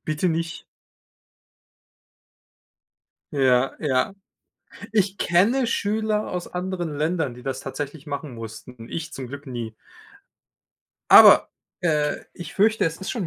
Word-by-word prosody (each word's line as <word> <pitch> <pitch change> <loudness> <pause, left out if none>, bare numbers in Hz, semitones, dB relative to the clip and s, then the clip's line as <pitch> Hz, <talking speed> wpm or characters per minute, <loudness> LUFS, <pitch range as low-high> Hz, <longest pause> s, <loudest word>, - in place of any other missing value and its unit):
Bitte 155 +4 0
nicht. 165 0 -3 2.7
Ja, 130 -1 +3
ja. 145 +6 0 0.8
Ich 200 -2 +1
kenne 225 +10 +3
Schüler 215 -1 -1
aus 180 -1 -4
anderen 180 -3 -3
Ländern, 155 -3 -1
die 125 - -12
das 135 0 -4
tatsächlich 145 +2 -6
machen 140 -3 -5
mussten, 115 +1 -10
ich 160 -1 -5
zum 130 -2 -6
Glück 140 +2 -9
nie. 120 -3 -5 1.4
Aber, - - +9 0.3
äh, 150 -4 +1 0.2
ich 175 - -9
fürchte, 220 +2 +3
es 165 0 -1
ist 190 - -5
schon 210 -9 -3
160 Hz, 120 wpm, -24 LUFS, 135-185 Hz, 2.7 s, Aber